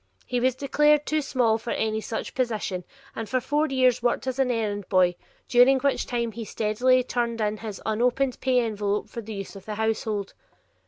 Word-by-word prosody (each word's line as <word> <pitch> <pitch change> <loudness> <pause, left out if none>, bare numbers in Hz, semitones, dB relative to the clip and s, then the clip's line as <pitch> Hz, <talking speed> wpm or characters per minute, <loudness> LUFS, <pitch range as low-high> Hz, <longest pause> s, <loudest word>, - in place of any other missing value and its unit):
He 250 - -1
was 255 0 +2
declared 295 +2 +3
too 310 0 +1
small 240 -5 +1
for 235 - -7
any 220 -1 -1
such 220 - -5
position, 215 -8 -2 0.3
and 225 -1 -5
for 255 - +1
four 295 +5 0
years 255 -3 +2
worked 240 +2 0
as 260 0 -3
an 265 -1 +2
errand 210 -4 -2
boy, 180 -1 +4 0.3
during 250 +2 +6
which 280 0 0
time 235 -2 -1
he 230 +1 -6
steadily 245 +4 +2
turned 235 -2 -2
in 210 0 0
his 210 -3 -7
unopened 245 +4 0
pay 255 -2 +3
envelope 210 -2 -2
for 235 - -6
the 220 0 -7
use 195 0 -7
of 195 - -11
the 215 - -4
household. 220 -2 -2
235 Hz, 195 wpm, -25 LUFS, 215-255 Hz, 0.3 s, during